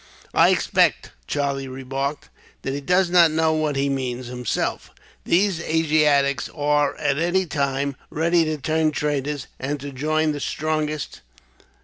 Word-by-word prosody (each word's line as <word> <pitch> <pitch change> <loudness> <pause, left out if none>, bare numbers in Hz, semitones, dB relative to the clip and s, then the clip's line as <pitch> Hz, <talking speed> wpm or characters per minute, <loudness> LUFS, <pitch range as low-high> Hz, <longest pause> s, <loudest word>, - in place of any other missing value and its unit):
"I - - +5
expect," - - +2 0.2
Charlie 140 -1 -1
remarked, 135 +2 -4 0.3
"that 135 - -2
he 140 - -4
does 180 +4 +2
not 175 -2 +6
know 160 0 +2
what 155 -2 0
he 135 +1 +1
means, 130 -2 -2
himself. 125 -1 -3 0.4
These 190 0 +2
Asiatics 150 -4 +2
are 145 -1 +1
at 145 -1 0
any 175 +3 +1
time 140 -2 -1
ready 170 +2 +2
to 155 0 -2
turn 155 +3 +1
traitors, 145 -1 -2
and 145 +2 -3
to 140 +1 -7
join 155 +3 0
the 145 - -4
strongest. 155 0 -3
150 Hz, 140 wpm, -23 LUFS, 140-155 Hz, 0.4 s, not